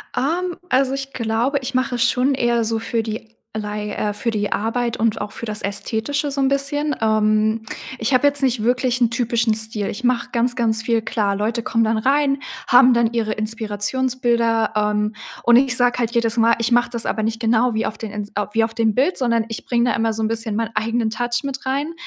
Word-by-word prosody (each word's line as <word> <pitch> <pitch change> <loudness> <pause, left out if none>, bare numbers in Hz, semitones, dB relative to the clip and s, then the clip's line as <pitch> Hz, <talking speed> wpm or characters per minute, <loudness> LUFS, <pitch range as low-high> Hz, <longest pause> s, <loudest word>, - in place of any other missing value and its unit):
Ähm, 345 +5 -1
also, 265 +1 +2
ich 275 0 -5
glaube, 235 +4 0
ich 255 - -5
mache 255 -1 0
schon 250 +3 +2
eher 240 -2 +1
so 225 0 -1
für 225 0 -2
die 220 0 -6 0.3
Lei 210 0 -4
äh, 210 - -1
für 230 +3 -2
die 205 -1 -2
Arbeit 230 +2 -1
und 220 -1 0
auch 205 - -5
für 235 - -7
das 210 -1 -3
Ästhetische 225 +8 -2
so 275 0 -2
'n 270 - +3
bisschen. 290 +2 0
Ähm, 215 0 +2 0.4
ich 225 +4 0
habe 255 +3 +5
jetzt 285 -1 +1
nicht 255 -3 +1
wirklich 250 +1 +1
'n 235 -2 +3
typischen 230 -2 +1
Stil. 220 -2 -1
Ich 245 - -6
mache 245 -1 +1
ganz, 245 +2 0
ganz 225 -2 +1
viel. 230 -1 +1
Klar, 205 -3 -1
Leute 225 +3 -1
kommen 230 -1 +1
dann 220 0 +1
rein, 275 +3 +2 0.3
haben 250 0 +7
dann 235 0 +2
ihre 220 -2 0
Inspirationsbilder, 230 +2 0
ähm, 210 0 0 0.3
und 240 0 +5
ich 255 0 +4
sage 245 0 +2
halt 235 -1 0
jedes 230 -1 +1
Mal, 230 0 +4
ich 235 +1 +1
mache 240 0 +3
das 235 -1 -2
aber 215 - -1
nicht 225 0 -2
genau 235 +1 +2
wie 220 +1 -1
auf 215 - -4
den 220 -2 -6
Ins 210 0 -5 0.2
wie 225 0 +2
auf 225 - -8
dem 225 -2 +1
Bild, 280 - +1
sondern 230 -3 +1
ich 225 - -6
bringe 240 0 +1
da - - 0
immer 225 0 +1
so 220 0 -4
'n 215 - +1
bisschen 225 -1 -2
meinen 230 -1 -3
eigenen 225 +1 0
Touch 240 +2 -1
mit 270 -1 -5
rein, 285 +5 -1
230 Hz, 220 wpm, -20 LUFS, 220-250 Hz, 0.4 s, haben